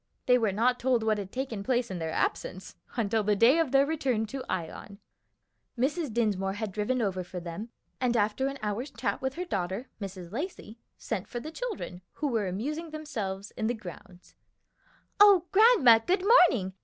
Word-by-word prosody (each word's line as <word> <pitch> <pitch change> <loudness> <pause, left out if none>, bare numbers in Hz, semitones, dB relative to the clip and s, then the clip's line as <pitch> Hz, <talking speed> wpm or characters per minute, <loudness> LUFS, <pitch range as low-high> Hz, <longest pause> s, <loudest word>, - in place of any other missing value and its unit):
They 250 0 +5
were 220 -4 +1
not 245 +5 +1
told 245 -2 +1
what 215 -1 +1
had 195 -1 -6
taken 255 -5 -4
place 245 -1 0
in 180 - -4
their 160 -1 -3
absence, 185 +3 -2 0.2
until 220 -1 +1
the 210 0 +2
day 240 +10 +5
of 320 -6 +1
their 275 0 +5
return 270 -8 0
to 260 +4 -6
Ion. 185 +3 -5 0.8
Mrs. 290 +3 0
Dinsmore 205 -4 0
had 210 0 -4
driven 220 +5 -1
over 190 -3 -1
for 180 +1 -7
them, 175 +6 -7 0.3
and 245 -2 +1
after 215 +5 +1
an 275 0 -4
hour's 215 +7 -2
chat - - -3
with 265 0 -2
her 360 +2 -3
daughter, 195 - -3
Mrs. 185 -3 -7
Lacey, 245 - -6 0.2
sent 210 -3 -4
for 240 - -5
the 310 +6 -7
children, 390 - -5
who 295 - -2
were 220 -5 0
amusing 295 - -3
themselves 215 -11 -5
in 220 - -2
the 240 - 0
grounds. 180 -3 -12 0.9
"O 400 -4 +7
grandma, 390 - +7
good 365 - 0
morning! 300 - +5
230 Hz, 180 wpm, -28 LUFS, 200-275 Hz, 0.9 s, O